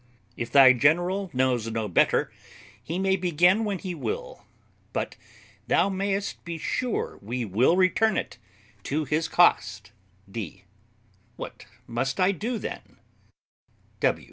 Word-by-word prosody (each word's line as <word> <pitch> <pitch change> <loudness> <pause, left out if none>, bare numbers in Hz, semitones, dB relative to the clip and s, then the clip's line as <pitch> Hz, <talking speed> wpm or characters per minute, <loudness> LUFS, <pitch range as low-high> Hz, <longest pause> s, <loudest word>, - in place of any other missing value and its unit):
If 115 - -5
thy 135 -2 +8
general 175 +9 +2
knows 125 -4 0
no 110 -1 -2
better, 90 - +2 0.5
he 160 +9 -4
may 190 0 +2
begin 180 +3 +3
when 200 -2 -1
he 180 0 -5
will; - - -5 0.5
but - - -3 0.5
thou - - +3
mayest 195 +1 -2
be 170 0 -5
sure 245 +8 -2
we 120 +4 -3
will 115 - +3
return 195 +4 +3
it - - -4 0.5
to 150 +2 -1
his 150 +4 0
cost. 105 - +2 0.4
D. 100 -5 -7 0.7
What - - -9 0.2
must 130 +7 -2
I 185 +1 +4
do, 225 +6 -3
then? - - -7
170 Hz, 125 wpm, -26 LUFS, 125-195 Hz, 0.7 s, thy